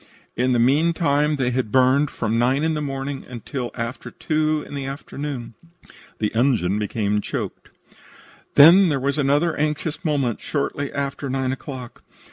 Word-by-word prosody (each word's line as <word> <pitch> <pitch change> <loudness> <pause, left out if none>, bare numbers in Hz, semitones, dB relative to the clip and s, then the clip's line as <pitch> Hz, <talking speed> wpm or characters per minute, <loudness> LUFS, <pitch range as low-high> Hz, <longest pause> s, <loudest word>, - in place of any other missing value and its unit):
In 125 +1 +1
the 125 - +3
meantime 150 +3 +2
they 130 -3 0
had 125 -4 -2
burned 130 +3 +4
from 115 0 -1
nine 130 +4 +2
o'clock - - +2
in 160 - +1
the 150 - -2
morning 135 -1 -4
until 125 +1 -5
after 115 +1 -5
two 155 -1 -1
in - - -10
the 140 -1 -4
afternoon. 140 -3 -6 0.6
THE 105 - -1
ENGINE 110 -6 +2
BECAME 105 -1 -1
CHOKED - - -5 0.9
"Then 175 +6 +8
there 140 -3 0
was 140 +3 -1
another 145 +4 +2
anxious 150 +2 -2
moment 140 - 0
shortly 145 -1 -2
after 140 0 -3
nine 130 0 -1
o'clock. 130 -2 -7
135 Hz, 155 wpm, -22 LUFS, 125-150 Hz, 0.9 s, Then